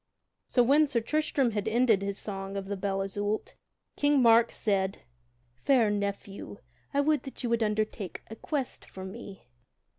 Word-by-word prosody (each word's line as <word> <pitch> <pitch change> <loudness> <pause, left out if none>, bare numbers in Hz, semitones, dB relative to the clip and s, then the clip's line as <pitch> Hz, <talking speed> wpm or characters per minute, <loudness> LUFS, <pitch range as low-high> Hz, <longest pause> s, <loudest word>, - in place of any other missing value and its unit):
So 245 - +4
when 290 +5 +5
Sir 260 -4 +1
Tristram 280 0 +1
had 210 -1 -2
ended 225 -2 +3
his 200 0 -3
song 195 -1 -5
of 195 - -4
the 200 +1 -3
Belle 195 0 -1
Isoult, 205 +2 -3 0.4
King 290 -1 +3
Mark 230 -1 +6
said: 195 -2 -1 0.5
"Fair 225 - +3
nephew, 200 0 -4 0.3
I 280 - +2
would 300 -1 +2
that 270 -1 -9
you 240 - -1
would 235 0 +2
undertake 210 -3 -2
a 220 - -8
quest 275 +2 -3
for 190 0 -9
me." 195 0 -9
215 Hz, 160 wpm, -29 LUFS, 200-250 Hz, 0.5 s, Mark